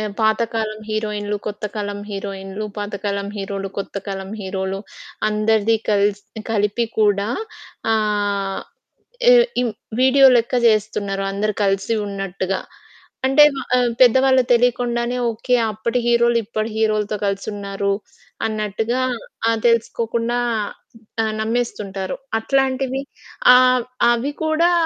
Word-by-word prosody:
ఆహ్, 210 -1 -3
పాతకాలం 220 0 0
హీరోయిన్లు, 210 -1 -2
కొత్త 210 0 -5
కాలం 205 -1 -3
హీరోయిన్లు, 195 +1 -5
పాతకాలం 200 -1 -3
హీరోలు, 195 0 -4
కొత్త 195 - -5
కాలం 195 0 -5
హీరోలు, 190 0 -3 0.5
అందరిది 215 +1 +2
కల్స్ 205 0 +2 0.3
కలిపి 210 +2 +1
కూడా 205 -1 +3 0.6
ఆహ్, 205 -2 0 0.7
ఎ - - +8 0.3
ఇవ్ 235 -3 -1 0.3
వీడియో 270 +1 +6
లెక్క 235 +1 0
జేస్తున్నారు 205 -2 +1
అందరు 210 +2 -1
కలిసి 195 +3 +1
ఉన్నట్టుగా. 195 -1 -3 0.7
అంటే 270 +3 +6 0.3
ఆహ్, 245 -1 +2
పెద్దవాళ్ళకి 260 +1 +5
తెలియకుండానే 240 0 +1 0.2
ఓకే. 235 +3 -1 0.2
అప్పటి 230 +4 -1
హీరోలు 235 0 +4
ఇప్పటి 215 0 -3
హీరోలతో 215 -1 +1
కలిసి 200 +1 -2
ఉన్నారు 200 0 -2 0.5
అన్నట్టుగా 220 +3 -1 0.5
ఆహ్, 230 -1 +2
తెలుసుకోకుండా 230 0 +1 0.9
ఆహ్, 220 -1 -1
నమ్మేస్తుంటారు. 210 -4 -2 0.2
అట్లాంటివి 265 +1 0 0.5
ఆహ్, 255 -1 +5 0.3
అవి 240 +5 0
కూడా 315 +2 +3
215 Hz, 105 wpm, -20 LUFS, 200-235 Hz, 0.9 s, ఎ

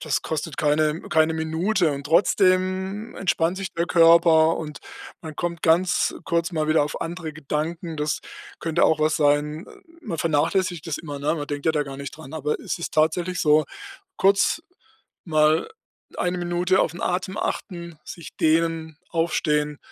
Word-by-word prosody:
das 135 -7 -1
kostet 160 -1 -4
keine 150 +1 +1
keine 160 0 +3
Minute 160 +2 0
und 140 0 -6
trotzdem 190 +5 +1
entspannt 175 -1 0
sich 195 -1 -4
der 170 - 0
Körper 165 -1 +5
und 150 -2 -6 0.4
man 155 -2 -9
kommt 170 -1 -3
ganz 175 +2 +2
kurz 170 +1 0
mal 155 -2 -1
wieder 155 -1 +4
auf 145 - -3
andere 165 -2 -6
Gedanken. 160 +2 -4
Das 150 0 -1 0.4
könnte 165 0 0
auch 160 - +4
was 155 +1 +2
sein. 150 +2 +1 0.4
Man 165 - -5
vernachlässigt 165 +2 0
das 160 - -3
immer, 145 -3 -7
ne, 150 +3 0
man 145 -3 -4
denkt 145 0 -4
ja 160 - +4
da 150 -1 +1
gar 135 -1 -8
nicht 140 +1 -7
dran, 155 -4 -11
aber 150 -1 -2
es - - -4
ist 170 - -5
tatsächlich 170 +3 +1
so, 150 0 +4 0.5
kurz 195 +10 +3 0.6
mal 155 -1 +2 0.5
1 180 0 0
Minute 175 +2 +1
auf - - +1
'n 170 - -9
Atem 185 +3 -2
achten, 170 -4 -4
sich 170 - -10
dehnen, 160 -1 +1
aufstehen, 150 -3 0
160 Hz, 165 wpm, -24 LUFS, 155-175 Hz, 0.6 s, Körper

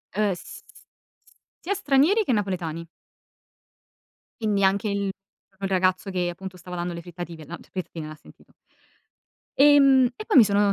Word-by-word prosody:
Eh, 210 -1 +2
s - - -11 1.0
sia 400 - -1
stranieri 375 +4 +3
che 260 - +1
napoletani. 175 -6 -2 1.6
Quindi 205 -2 +1
anche 195 +2 +2
il 200 0 -1 0.5
proprio 195 0 -6
il - - -3
ragazzo 185 +1 +1
che 180 -1 -1
appunto 185 +1 -8
stava 180 0 -9
dando 175 0 -3
le 170 - -7
frittative 170 -2 -9
la 165 +4 -7
le - - -19
frittatine, 170 -4 -6
l'ha 155 - -8
sentito. 155 - -20 1.1
Ehm, 275 -2 +6
e 430 - -7
poi 430 - +3
mi 240 - +10
sono 205 -1 +1
195 Hz, 155 wpm, -25 LUFS, 175-255 Hz, 1.6 s, mi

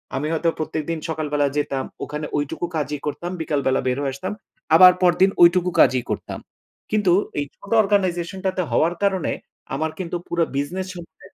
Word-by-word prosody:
আমি 145 +3 -1
হয়তো 165 +1 +1
প্রত্যেকদিন 155 +1 -3
সকালবেলা 150 -2 0
যেতাম, 135 -2 -1 0.2
ওখানে 150 +1 -4
ঐটুকু 145 +4 -2
কাজই 150 -1 -2
করতাম, 175 +4 -4
বিকালবেলা 140 -4 0
বের 125 +1 +1
হয়ে 135 -2 -2
আসতাম। 140 - -4 0.4
আবার 180 +1 +10
পরদিন 180 +2 +5
ঐটুকু 180 +1 +5
কাজই 125 -2 +5
করতাম। - - -4 0.5
কিন্তু 205 -5 +3 0.3
এই 145 - -1
ছোট 200 - -14
অর্গানাইজেশনটাতে 190 -1 0
হওয়ার 170 +3 +2
কারণে 190 -4 +1 0.4
আমার 160 +2 -1
কিন্তু 175 -1 -4
পুরা 170 -1 +1
বিজনেস 180 +7 -2
সম্পর্কে 175 +2 -13
165 Hz, 155 wpm, -22 LUFS, 145-185 Hz, 0.5 s, আবার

